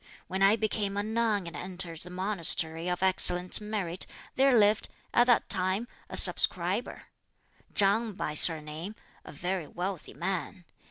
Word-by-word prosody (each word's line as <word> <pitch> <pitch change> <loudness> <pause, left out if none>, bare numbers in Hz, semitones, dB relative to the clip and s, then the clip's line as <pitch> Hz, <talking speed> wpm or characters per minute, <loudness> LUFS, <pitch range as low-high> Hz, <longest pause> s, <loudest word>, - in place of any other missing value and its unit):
When 190 +1 -5
I 195 +2 +5
became 210 -2 -2
a 205 - 0
nun 220 -3 -1
and 170 -2 -8
entered 180 -1 -7
the 180 - -3
monastery 180 -3 +1
of 180 +1 -2
Excellent 180 0 +3
Merit, 200 -5 -4 0.3
there 265 -2 +4
lived, 210 0 +3 0.3
at 240 - +4
that 245 - +3
time, 185 +5 0 0.2
a - - -2
subscriber, - - +2 0.7
Chang 210 +3 +2
by 150 - -4
surname, 160 +5 +2 0.3
a - - -11
very 175 +2 -4
wealthy 180 +2 -6
man. 180 +2 -4
190 Hz, 145 wpm, -28 LUFS, 175-210 Hz, 0.7 s, I